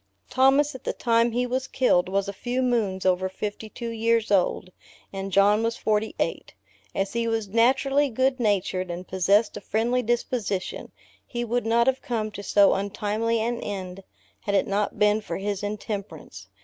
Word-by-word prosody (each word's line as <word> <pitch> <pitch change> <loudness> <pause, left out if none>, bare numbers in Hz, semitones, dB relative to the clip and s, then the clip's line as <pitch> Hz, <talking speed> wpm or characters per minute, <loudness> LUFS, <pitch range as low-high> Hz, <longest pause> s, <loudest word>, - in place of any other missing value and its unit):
Thomas, 270 +3 +4
at 260 - -10
the - - -2
time 235 0 +2
he 245 +2 0
was 260 +2 -2
killed, 185 -9 +2
was 195 +1 0
a 200 - -4
few 250 +5 -2
moons 215 -7 0
over 185 0 +2
fifty 210 +3 -5
two 235 +2 -6
years 230 -1 +1
old, 185 -1 +1 0.4
and 195 0 -5
John 200 +3 +4
was 230 0 -1
forty 215 0 0
eight. - - -3 0.4
As 195 0 -1
he 235 0 -1
was 225 -2 -1
naturally 270 +6 +3
good 260 +2 +1
natured, 190 -4 0
and 175 +1 -6
possessed 200 +4 +2
a - - -8
friendly 235 +5 0
disposition, 235 -4 -2 0.3
he 240 -1 -4
would 240 0 -1
not 235 +1 +3
have 265 0 +1
come 220 -3 -2
to 200 - -7
so 200 0 +4
untimely 210 +3 -1
an 235 +1 -1
end, 190 -2 -6 0.4
had 200 - -2
it - - +3
not 200 +1 -1
been 210 +1 +3
far 170 -5 -5
his 200 0 -3
intemperance. 205 - -6
215 Hz, 175 wpm, -25 LUFS, 195-240 Hz, 0.4 s, Thomas